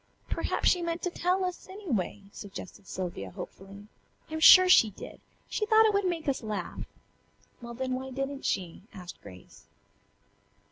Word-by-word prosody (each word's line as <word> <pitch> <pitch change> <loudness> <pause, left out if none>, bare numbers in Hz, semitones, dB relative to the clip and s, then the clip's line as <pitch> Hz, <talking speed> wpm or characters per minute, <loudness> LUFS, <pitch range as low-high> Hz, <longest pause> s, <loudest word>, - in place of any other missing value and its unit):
"Perhaps - - +1
she 360 - +2
meant 335 0 -3
to 360 - -1
tell 365 +2 0
us, 360 0 -6
anyway," 250 - -3
suggested 200 -2 -10
Sylvia 175 - -5
hopefully. 195 - -10 0.5
"I'm 315 - -3
sure 370 +3 +9
she 230 -11 +6
did. 200 - -11 0.3
She 425 - -2
thought 440 0 +6
it 430 - +3
would 400 -1 +1
make 340 -4 -2
us 275 - 0
laugh." 210 -5 -5 0.7
"Well, 235 0 -8
then 260 +1 -3
why 260 +1 -4
didn't 270 +1 -4
she?" 180 -3 -2
asked 180 -2 -10
Grace. 90 -2 -14
260 Hz, 155 wpm, -29 LUFS, -, 0.7 s, sure